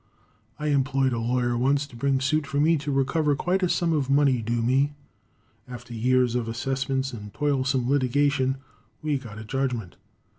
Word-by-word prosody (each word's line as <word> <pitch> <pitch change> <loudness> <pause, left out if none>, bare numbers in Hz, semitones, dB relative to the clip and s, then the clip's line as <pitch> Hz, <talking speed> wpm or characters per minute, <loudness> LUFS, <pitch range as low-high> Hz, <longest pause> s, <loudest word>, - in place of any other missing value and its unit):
I 150 0 -2
employed 135 -2 +1
a 115 - -1
lawyer 120 +1 0
once 135 +4 +2
to 140 - -16
bring 135 +2 +1
suit 150 +2 +1
for 140 - -1
me 160 +3 +4
to 145 -1 -3
recover 145 +2 +1
quite 180 +6 0
a 180 - +1
sum 170 -1 +1
of 140 -4 0
money 140 -3 +3
due 115 +1 -1
me. 135 +4 +2 0.7
After 125 -1 -9
years 125 +1 +2
of 120 -2 -1
assessments 135 +3 -2
and 105 -3 -8
toilsome 135 -3 0
litigation, 140 0 +2 0.5
we 150 -3 0
got 115 -5 -10
a 110 - -7
judgment. 120 -5 -3
135 Hz, 175 wpm, -25 LUFS, 120-145 Hz, 0.7 s, me